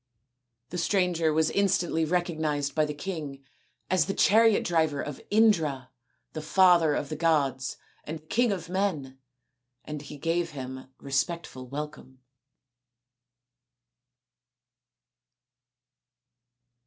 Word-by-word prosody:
The 180 - -4
stranger 175 -3 +1
was 160 +1 +2
instantly 175 -5 +1
recognised 155 -4 -1
by 155 -1 +2
the 150 - -4
king 145 -5 -6 0.4
as 180 -5 +2
the 195 - -2
chariot 225 +1 +4
driver 160 -4 +1
of 145 -1 -5
Indra, 160 - +2 0.4
the 155 - -4
father 170 -2 +4
of 145 - -3
the 155 - -3
gods 140 -6 0 0.3
and 155 0 -8
king 240 +3 +2
of 180 -5 -4
men, 165 -8 -2 0.7
and 150 -1 -6
he 145 0 -10
gave 165 +2 -1
him 130 0 -7
respectful 140 -1 -3
welcome. 140 -2 -8
160 Hz, 105 wpm, -27 LUFS, 145-175 Hz, 0.7 s, chariot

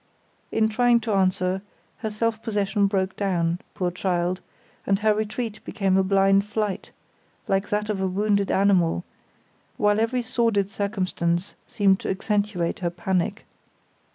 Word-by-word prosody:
In 220 0 +3
trying 240 +2 +3
to 220 - -3
answer, 185 -1 +1 0.4
her 220 - -3
self 220 +1 -1
possession 205 -2 +1
broke 190 -1 -1
down, 175 -4 0 0.2
poor 180 -1 -1
child, 180 0 -1 0.5
and 195 - +3
her 215 +1 +3
retreat 215 +1 -3
became 195 -2 0
a 190 - +5
blind 195 +1 +4
flight, 210 -1 -3 0.6
like 195 +1 0
that 210 0 0
of 205 -3 -2
a 190 - +1
wounded 200 +1 +1
animal, 185 -4 +3 0.7
while 210 -3 +3
every 240 +2 0
sordid 230 -5 +1
circumstance 185 -4 -1
seemed 195 -3 +3
to - - -4
accentuate 200 -3 -1
her 175 -2 0
panic. 180 +1 -2
200 Hz, 140 wpm, -24 LUFS, 185-215 Hz, 0.7 s, a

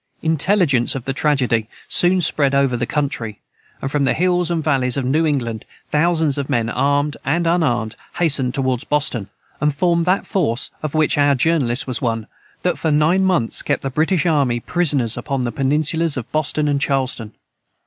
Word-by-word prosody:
Intelligence 160 - +2
of 130 -2 -5
the 135 - -2
tragedy 125 -7 0 0.2
soon 180 +1 +3
spread 140 -4 +2
over 135 -2 +2
the 120 - -2
country, 120 -8 -3 0.4
and 135 - -2
from 145 -1 +1
the 135 - +1
hills 180 -1 +1
and 165 -2 -1
valleys 135 -5 +1
of 135 - -1
New 155 +5 +1
England 120 -7 -2 0.3
thousands 160 -2 +1
of 140 - -4
men, 120 -4 0
armed 145 +3 0
and 165 +5 0
unarmed, 120 -10 0 0.2
hastened 140 -7 +2
toward 130 -3 0
Boston, 130 -9 -1 0.3
and 150 -1 +1
formed 170 +2 +1
that 185 +2 +1
force 150 - -1
(of 155 0 -4
which 155 -1 +2
our 145 -1 +4
Journalist 135 -3 +1
was 130 -3 -3
one) 115 -3 -1 0.4
that, 180 - 0
for 160 - 0
nine 155 +5 +3
months, 180 -12 +1
kept - - -2
the 135 - -3
British 160 +5 +1
army 140 -8 +1
prisoners 140 -6 +1
upon 135 -2 -2
the 120 - -2
peninsulas 150 +5 0
of 120 - -6
Boston 155 0 0
and 140 -1 0
Charlestown. 130 -6 -1
145 Hz, 180 wpm, -19 LUFS, 125-160 Hz, 0.4 s, our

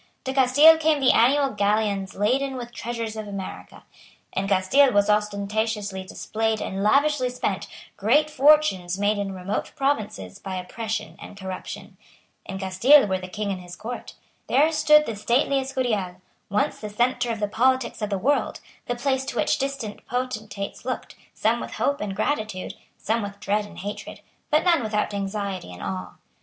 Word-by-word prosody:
To 265 - -3
Castile 280 +5 +7
came 315 -2 +2
the 265 -2 +5
annual 275 +3 +4
galleons 205 -1 0
laden 265 +6 +1
with 245 -2 -6
the - - -28
treasures 230 -2 -4
of 215 -1 -5
America. 195 -2 -7 0.5
In 195 +1 -1
Castile 200 +9 +4
was 205 0 +3
ostentatiously 210 -1 -1
displayed 220 +3 -2
and 190 +1 -4
lavishly 275 +4 +3
spent 250 - -3 0.3
great 265 +10 +3
fortunes 275 -12 +4
made 205 +1 +1
in 200 -1 -2
remote 190 +2 -3
provinces 215 - -2
by 190 -1 -5
oppression 195 -1 -4
and 205 - -10
corruption. 190 -1 -7 0.5
In 190 - -5
Castile 195 +10 +5
were 190 -2 -1
the 185 - -7
King 205 +2 -3
and 185 -1 -4
his 175 0 -10
Court. 240 +6 -7 0.3
There 300 +4 +4
stood 300 -1 +5
the 225 - -4
stately 250 +6 +1
Escurial, 245 -9 -1 0.3
once 205 +1 0
the 210 - -6
centre 245 +3 0
of 225 - -3
the 205 - 0
politics 255 +2 +1
of 210 - -1
the 200 - 0
world, 280 +9 0 0.3
the 245 - -1
place 265 +1 0
to - - -5
which - - +1
distant 270 -6 -4
potentates 220 -5 -4
looked, 255 +1 -5 0.2
some - - +1
with - - -6
hope 285 0 0
and 200 -2 -3
gratitude, 215 -7 -2 0.2
some 225 +3 -1
with 200 -1 -6
dread 205 +1 0
and - - -14
hatred, 205 +2 -7 0.3
but 305 -1 +3
none 345 -5 +4
without 210 -2 -1
anxiety 195 - -3
and 90 - -9
awe. 95 -2 -5
215 Hz, 170 wpm, -24 LUFS, 200-260 Hz, 0.5 s, Castile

